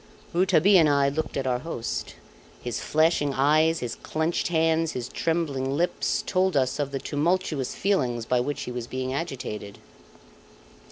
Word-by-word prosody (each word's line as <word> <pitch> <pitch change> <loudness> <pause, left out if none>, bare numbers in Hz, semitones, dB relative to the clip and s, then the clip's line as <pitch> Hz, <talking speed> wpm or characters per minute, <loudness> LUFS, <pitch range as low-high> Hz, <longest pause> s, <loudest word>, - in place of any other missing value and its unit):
Rouletabille 185 +2 +5
and 155 -2 +5
I 140 -1 +3
looked 155 +3 -3
at 135 - -2
our 125 -1 0
host. 125 -6 -4 0.4
His 120 -1 -4
flashing 155 -3 +2
eyes, 155 +4 +3
his 120 -2 -3
clenched 160 +2 -2
hands, 165 -1 +1
his 125 -1 -4
trembling 140 -5 -1
lips, 175 +2 0
told 185 -4 +1
us 130 +1 +1
of 145 -2 0
the 140 - -2
tumultuous 150 -1 -1
feelings 125 - 0
by 125 +1 +2
which 145 +4 -2
he - - -5
was 120 -1 -5
being 130 0 -3
agitated. 125 - -5
145 Hz, 155 wpm, -26 LUFS, 130-165 Hz, 0.4 s, Rouletabille